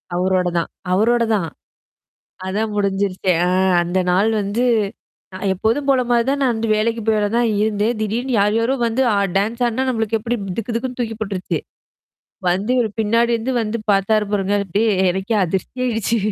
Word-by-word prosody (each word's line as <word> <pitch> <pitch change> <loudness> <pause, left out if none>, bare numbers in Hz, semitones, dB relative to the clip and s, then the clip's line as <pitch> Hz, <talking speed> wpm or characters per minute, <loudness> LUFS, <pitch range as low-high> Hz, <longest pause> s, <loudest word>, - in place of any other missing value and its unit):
அவரோட 185 0 +1
தான் 170 - -1 0.2
அவரோட 235 +4 +3
தான். 170 -5 -1 1.0
அதான் 210 +3 -2
முடிஞ்சருச்சே. 195 -2 0
அ - - +1 0.3
அந்த 175 +2 -1
நாள் 200 +5 +3
வந்து 210 +5 -1 0.7
நான் 195 +1 -2
எப்போதும் 230 +9 -1
போல 260 -2 +4
மாரி 235 -1 +3
தான் 280 0 0
நான் 250 -3 +2
வந்து 225 0 -2
வேலைக்கு 225 +1 0
போய் 220 -1 +2
வேல 205 0 +1
தான் 240 -1 +2
இருந்தேன். 215 +2 0
திடீர்னு 240 +5 -2
யார் 205 +1 +2
யாரோ 235 +4 +1
வந்து 235 +4 0
அ - - +2 0.2
டான்ஸ் 230 +5 -1
ஆடுனா 260 +3 -1
நம்மளுக்கு 225 -2 0
எப்டி 235 +2 -2 0.2
துக்கு 230 +1 -3
தக்குன்னு 250 +1 -3
தூக்கி 225 -2 -2
போட்டுருச்சு. 195 -3 -2 0.9
வந்து 195 +7 -1
இவரு 230 -3 +2
பின்னாடி 230 +2 +2
இருந்து 245 +4 -3
வந்து 220 +2 -3
பார்த்தாரு 210 +2 +2
பாருங்க. 200 0 0
அப்டியே 210 +5 +1 0.2
எனக்கே 190 +4 -1
அதிர்ச்சி 190 +7 -3
ஆயிடுச்சு. 230 -1 0
220 Hz, 170 wpm, -20 LUFS, 195-235 Hz, 1.0 s, போல